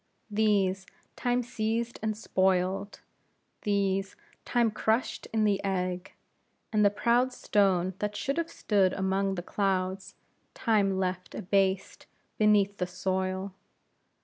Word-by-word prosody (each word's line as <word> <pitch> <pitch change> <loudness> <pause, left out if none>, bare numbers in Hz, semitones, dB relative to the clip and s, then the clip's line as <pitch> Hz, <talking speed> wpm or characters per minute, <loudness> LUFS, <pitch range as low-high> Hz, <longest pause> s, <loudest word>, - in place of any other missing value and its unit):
These 200 -3 +2 0.3
Time 245 0 0
seized 230 +1 -2
and 215 -1 -1
spoiled; 190 0 0 0.6
these 195 -1 0 0.3
Time 235 -2 +2
crushed 220 +3 -1
in 220 -1 +1
the 200 -2 +1
egg; 185 -2 -2 0.6
and 210 -1 +4
the 205 - +6
proud 235 +5 +2
stone 190 -6 +1
that 210 0 -2
should 275 +8 -1
have 335 0 -2
stood 195 -3 +1
among 195 0 0
the 175 - -4
clouds, 190 -1 -1 0.4
Time 205 -5 +2
left 185 -1 -3
abased 195 -1 0 0.3
beneath 205 -2 +4
the 180 - -1
soil. 185 +1 -2
195 Hz, 120 wpm, -29 LUFS, 190-215 Hz, 0.6 s, the